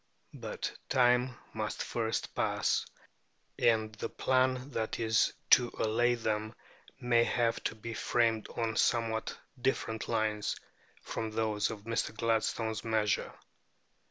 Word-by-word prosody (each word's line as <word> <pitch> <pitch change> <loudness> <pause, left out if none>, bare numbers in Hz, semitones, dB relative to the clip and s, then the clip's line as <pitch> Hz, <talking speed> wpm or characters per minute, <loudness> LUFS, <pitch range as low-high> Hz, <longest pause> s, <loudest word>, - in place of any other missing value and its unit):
But - - -5
time 125 -1 +3 0.2
must 110 -1 -3
first 115 -1 -2
pass, - - +1 0.7
and 110 -2 +3
the 105 - -4
plan 130 +1 +1
that 110 -3 -2
is 110 -1 +3 0.2
to 120 -1 +7
allay 120 +3 +2
them 110 -1 -2 0.4
may 120 -2 +4
have 120 -1 0
to - - -1
be 115 +1 -6
framed 115 -1 +1
on 115 -2 -1
somewhat 115 -1 +1 0.2
different 110 -3 -1
lines 110 -2 0 0.5
from 110 - -3
those 110 -1 0
of 110 -2 -6
Mr. 115 0 -2
Gladstone's 110 -1 0
measure. 110 -2 +1
115 Hz, 120 wpm, -32 LUFS, 110-120 Hz, 0.7 s, to